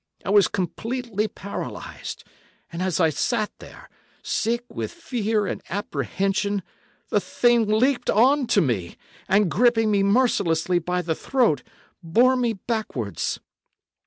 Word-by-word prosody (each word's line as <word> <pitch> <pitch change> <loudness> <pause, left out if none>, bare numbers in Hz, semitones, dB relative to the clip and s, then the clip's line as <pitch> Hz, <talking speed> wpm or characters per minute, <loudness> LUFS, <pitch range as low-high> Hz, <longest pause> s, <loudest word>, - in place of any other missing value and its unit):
I 190 - -1
was 205 -1 +6
completely 220 +4 -2
paralysed, 200 -1 -7 0.5
and 170 - -4
as 185 -2 0
I 160 -3 +4
sat 215 - -1
there, - - -13 0.4
sick 235 +2 -1
with 230 - -5
fear 225 -10 -1
and - - -4
apprehension, 200 0 -1 0.5
the - - +3
thing 240 -2 +2
leaped 245 +4 +2
on 260 +5 +4
to 200 - +3
me, 110 - -1 0.3
and, 200 -2 +3
gripping 225 -2 +3
me 200 -1 +3
mercilessly 195 -6 +2
by 180 +1 -2
the 165 -1 0
throat, 225 - +1 0.4
bore 235 +10 +4
me 240 -3 +1
backwards. 195 - -3
210 Hz, 130 wpm, -24 LUFS, 180-235 Hz, 0.5 s, was